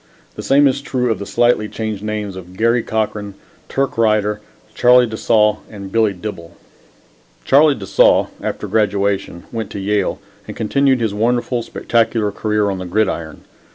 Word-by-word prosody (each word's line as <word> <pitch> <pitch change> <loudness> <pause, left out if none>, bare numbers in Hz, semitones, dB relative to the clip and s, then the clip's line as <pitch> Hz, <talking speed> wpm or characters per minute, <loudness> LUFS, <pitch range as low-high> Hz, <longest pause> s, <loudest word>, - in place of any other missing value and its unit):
The - - -6
same 140 +1 +4
is 135 +1 0
true 125 -4 -1
of 110 - -2
the 100 - -6
slightly 120 -3 +2
changed 110 -3 -4
names 105 -2 -4
of 90 0 -11
Garry 115 +2 +2
Cochran, 105 -3 -3 0.3
Turk 135 -3 -1
Righter, 105 -2 +1 0.3
Charlie 125 0 +5
de 110 -2 -6
Saulles 105 -1 +2
and 100 -3 -9
Billy 110 -1 +2
Dibble. 90 -3 -8 0.9
Charlie 145 +1 +5
de 100 - -8
Saulles, - - +4
after - - -4
graduation, 100 -4 0
went 110 -3 -4
to 100 - -6
Yale 105 +1 -1 0.3
and - - -8
continued 135 +3 +1
his 110 -3 0
wonderful, 120 +3 0
spectacular 115 -2 0
career 105 0 0
on 95 - -4
the 95 - -5
gridiron. 90 -5 -2
110 Hz, 160 wpm, -18 LUFS, 100-120 Hz, 0.9 s, Charlie